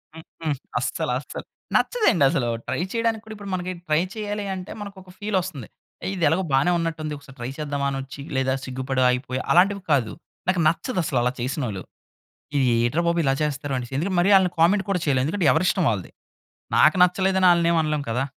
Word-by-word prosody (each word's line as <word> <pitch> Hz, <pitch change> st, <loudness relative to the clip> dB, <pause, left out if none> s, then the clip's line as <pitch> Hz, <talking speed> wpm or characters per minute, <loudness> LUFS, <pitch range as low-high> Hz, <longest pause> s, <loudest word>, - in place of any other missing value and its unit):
హ్మ్. 160 Hz, -, -10 dB, 0.2 s
హ్మ్. 155 Hz, -3 st, 0 dB, 0.2 s
అస్సల -, -, -2 dB
అస్సల -, -, -8 dB, 0.3 s
నచ్చదండి 420 Hz, -, +3 dB
అసలు! 125 Hz, -3 st, 0 dB, 0.2 s
ట్రై -, -, -1 dB
చేయడానికి 230 Hz, -1 st, 0 dB
కూడా 220 Hz, -, -8 dB
ఇప్పుడు 205 Hz, -1 st, -9 dB
మనకి 185 Hz, 0 st, -2 dB, 0.2 s
ట్రై 155 Hz, +1 st, +3 dB, 0.2 s
చేయాలి 210 Hz, -1 st, -3 dB
అంటే 185 Hz, +1 st, -7 dB
మనకు 200 Hz, -1 st, -8 dB
ఒక 185 Hz, -, -17 dB
ఫీల్ 205 Hz, -2 st, -1 dB
వస్తుంది. 155 Hz, -10 st, -7 dB, 0.5 s
ఇది 180 Hz, -3 st, -3 dB
ఎలాగో 165 Hz, +6 st, +2 dB
బానే 135 Hz, +6 st, +4 dB
ఉన్నట్టుంది 160 Hz, -2 st, -3 dB
ఒకసారి 135 Hz, -2 st, -15 dB
ట్రై 120 Hz, +1 st, -4 dB
చేద్దామా 145 Hz, -2 st, -2 dB
అనొచ్చు. 135 Hz, +1 st, -6 dB
లేదా 130 Hz, 0 st, +1 dB
సిగ్గుపడి 130 Hz, 0 st, -2 dB
ఆగిపోయి, 125 Hz, +1 st, -1 dB
అలాంటివి 195 Hz, +3 st, +4 dB
కాదు. 130 Hz, -7 st, +2 dB, 0.3 s
నాకు 185 Hz, -1 st, +2 dB
నచ్చదు 185 Hz, +4 st, 0 dB
అసలు 145 Hz, -4 st, -1 dB
అలా 125 Hz, +1 st, +1 dB
చేసినోళ్ళు. 120 Hz, -, -3 dB, 0.7 s
ఇది 135 Hz, -2 st, +3 dB, 0.2 s
ఏట్రా 120 Hz, +8 st, +1 dB
బాబు 170 Hz, 0 st, +1 dB
ఇలా 135 Hz, -, +2 dB
చేస్తనారు 145 Hz, -2 st, -2 dB
అనేసి. 125 Hz, +1 st, -7 dB
ఎందుకంటే 180 Hz, +7 st, -1 dB
మరి 175 Hz, -, +2 dB
ఆళ్ళని 185 Hz, -2 st, +3 dB
కామెంట్ 190 Hz, +5 st, +4 dB
కూడా 185 Hz, -2 st, +1 dB
చేయలేం. 135 Hz, -4 st, +2 dB
ఎందుకంటే 175 Hz, +1 st, 0 dB
ఎవరి 160 Hz, +5 st, +1 dB
ఇష్టం 190 Hz, -3 st, +1 dB
వాళ్ళది. 100 Hz, -5 st, -3 dB, 0.7 s
నాకు 155 Hz, -, +5 dB
నచ్చలేదని 190 Hz, +1 st, +3 dB
ఆళ్ళని 170 Hz, -1 st, +3 dB
ఏమి 170 Hz, -, +3 dB
అనలేం 150 Hz, -1 st, -1 dB
కదా! 125 Hz, +3 st, 0 dB
160 Hz, 190 wpm, -24 LUFS, 135-185 Hz, 0.7 s, నాకు